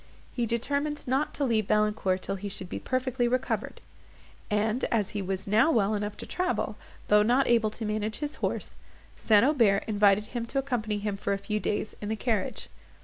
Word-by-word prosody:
He 240 -2 -1
determined 285 +6 -1
not 270 +4 +1
to 290 - -1
leave 220 -5 +1
Valancourt 210 -3 +1
till - - -2
he 200 +1 -5
should 185 -2 -5
be - - -4
perfectly 255 -1 0
recovered; 255 +2 -2 0.7
and, 215 +3 0
as 210 -4 0
he 205 - -3
was 190 +1 -3
now 220 +10 +4
well 215 -6 +2
enough 205 0 -3
to - - -7
travel, 365 0 -1 0.3
though 210 0 +6
not 245 +6 +3
able 230 -2 +3
to 220 +1 -6
manage 215 0 -2
his 295 0 -4
horse, - - -2 0.4
St. 215 +1 +4
Aubert 230 -9 +3
invited 205 -1 +3
him 235 -1 -3
to 275 - -4
accompany 240 -6 -1
him 205 -1 -3
for 200 - -1
a - - 0
few 210 +2 -2
days 210 +1 -2
in 205 - -4
the 220 - 0
carriage. 220 -2 -2
215 Hz, 195 wpm, -28 LUFS, 205-245 Hz, 0.7 s, though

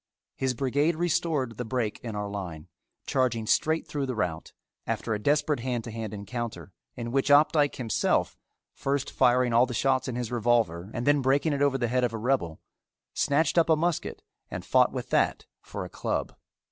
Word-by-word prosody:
His 130 -1 -1
brigade 145 +6 +1
restored 155 -8 0
the 125 - -2
break 115 -2 -2
in 115 -3 -6
our 105 0 -3
line, 90 -6 -6 0.4
charging 125 -4 0
straight 160 +8 +1
through 140 -2 -3
the 130 - -3
rout, 90 -7 -3 0.4
after 115 - -1
a 105 - -2
desperate 145 +2 +2
hand 120 -1 -2
to 115 - -7
hand 110 -2 -5
encounter 110 -1 -6 0.2
in 120 -1 -5
which 135 +2 +1
Opdycke 145 0 +4
himself, 115 -4 0 0.4
first 140 0 -2
firing 125 -1 +3
all 120 +2 +5
the 125 - -5
shots 130 +1 +1
in 125 - -3
his 120 -2 -3
revolver 115 -7 +1
and 120 - -2
then 145 0 +4
breaking 140 +4 +2
it 140 - -2
over 140 -1 +3
the 120 -2 0
head 125 +2 +1
of 120 -2 0
a - - -2
rebel, 110 -9 -1 0.5
snatched 155 +4 +2
up 165 - +2
a 160 - +6
musket 170 +1 -2 0.3
and - - -6
fought - - +4
with - - -6
that - - +1 0.2
for - - -6
a - - -6
club. - - -3
125 Hz, 190 wpm, -27 LUFS, 115-145 Hz, 0.5 s, a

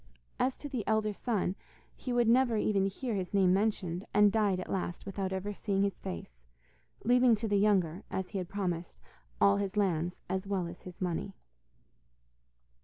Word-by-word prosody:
As 255 +1 +1
to 290 - -6
the 255 -6 -3
elder 215 0 +2
son, 200 -4 -1 0.4
he 255 - -5
would 240 -1 +3
never 240 -1 +4
even 200 -2 +2
hear 230 +5 -3
his 190 -1 -2
name 185 -2 +5
mentioned, 190 -3 0
and 210 -1 +6
died 205 -4 +2
at 185 - -5
last 180 -2 -3
without 195 -1 -3
ever 190 +2 -3
seeing 200 -1 0
his 200 -1 -1
face, 60 -9 -7 0.6
leaving 245 0 +5
to 220 +1 -3
the 205 -1 +2
younger, 190 -4 +2
as 190 -1 -3
he 200 - -3
had 180 -1 -5
promised, 180 -4 -3 0.4
all 200 0 +5
his 200 0 -2
lands, 180 -3 +1
as 190 +1 -2
well 195 -3 0
as 170 +1 -8
his 180 -1 -11
money. 185 +2 -2
195 Hz, 180 wpm, -31 LUFS, 185-215 Hz, 0.6 s, and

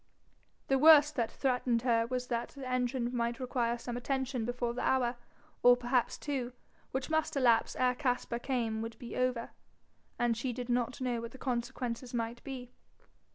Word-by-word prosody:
The 270 0 +3
worst 300 0 +8
that 230 -2 +1
threatened 250 -3 0
her 230 -2 +2
was 250 0 -2
that 235 -1 -2
the 275 -2 -8
engine 250 -1 -1
might 235 0 -1
require 245 -2 0
some 240 0 -5
attention 260 -1 -2
before 245 0 -2
the 245 - -4
hour, 250 -2 +2 0.5
or 245 0 +7
perhaps 245 0 0
two, 260 -4 -3 0.4
which 265 +2 -3
must 315 -1 +1
elapse 245 -4 +3
ere 250 0 +2
Caspar 250 -3 -1
came 235 -4 -1
would 230 0 -6
be 240 - -8
over, 255 -2 0 0.7
and 240 -1 +2
she 245 +2 -2
did 245 +1 -6
not 245 +1 0
know 245 -2 -1
what 235 0 -7
the - - -10
consequences 245 -1 -3
might 235 0 -3
be. 250 -2 -7
245 Hz, 170 wpm, -32 LUFS, 235-260 Hz, 0.7 s, worst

